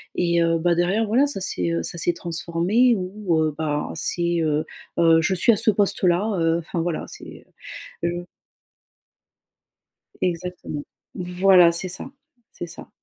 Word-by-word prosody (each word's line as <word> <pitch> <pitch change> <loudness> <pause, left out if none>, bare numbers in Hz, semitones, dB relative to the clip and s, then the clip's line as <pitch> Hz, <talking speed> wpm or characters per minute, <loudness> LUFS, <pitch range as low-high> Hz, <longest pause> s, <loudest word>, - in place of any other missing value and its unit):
et 170 -1 +1
heu, 165 0 +2
bah 175 +1 +2
derrière, 185 +6 +1
voilà 250 +7 +3
ça 280 - -3
s'est, 90 - -1
heu, 85 0 -1
ça 170 - -2
s'est 175 - +1
transformé 175 +8 +1
où, 185 -2 -2
heu, 155 -1 -1
bah, 150 -2 -2
c'est 170 +1 0
heu 155 -1 0 0.3
heu, 165 -1 +5
je 190 - 0
suis 185 +6 +4
à - - +1
ce 225 +2 +4
poste-là, 195 -1 +1
heu, 165 0 +2
enfin 170 0 -4
voilà 170 -1 -3
c'est, - - -12 0.6
je 170 - +1 2.1
Exactement. 180 -4 -4 0.3
Voilà 180 -1 +4
c'est 170 +2 +1
ça. 180 +8 -1 0.4
C'est 175 - -7
ça. - - -9
175 Hz, 150 wpm, -22 LUFS, 165-190 Hz, 2.1 s, heu